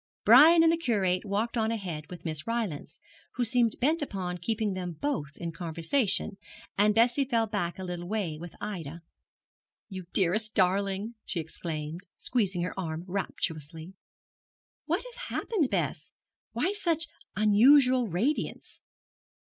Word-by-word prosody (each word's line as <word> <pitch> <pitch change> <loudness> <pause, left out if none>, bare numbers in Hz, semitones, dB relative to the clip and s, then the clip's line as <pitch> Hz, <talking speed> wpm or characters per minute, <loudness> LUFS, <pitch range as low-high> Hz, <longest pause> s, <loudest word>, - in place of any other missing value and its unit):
Brian 330 +2 +8
and 325 - +5
the 330 - +1
Curate 200 - 0
walked 210 +4 -1
on 220 -1 +1
ahead 180 -9 -4
with 180 -1 -10
Miss 155 +1 -3
Rylance, 225 -10 -3 0.3
who 250 - -1
seemed 235 -1 +2
bent 305 +6 +2
upon 185 -9 -4
keeping 215 +3 -1
them 180 -2 -4
both 155 - -3
in 170 -1 -4
conversation, 180 - -1 0.4
and 210 +1 +3
Bessie 240 +4 +4
fell 235 -4 +1
back 200 -5 -3
a 190 - -6
little 175 -1 -5
way 200 -6 -2
with 175 -1 -9
Ida. 170 -6 -6 0.9
'You 185 -3 -7
dearest 210 +4 +2
darling,' 195 +3 +1
she 180 - -3
exclaimed, 160 0 -4 0.2
squeezing 195 -8 0
her 180 - -3
arm 160 -2 -4
rapturously. 165 -3 -4 0.9
'What 340 +5 0
has - - -11
happened, 350 - 0
Bess? 165 -5 -2 0.4
Why 250 +12 0
such 335 -6 0 0.3
unusual 250 +4 +5
radiance?' 215 - -2
200 Hz, 140 wpm, -28 LUFS, 175-235 Hz, 0.9 s, Brian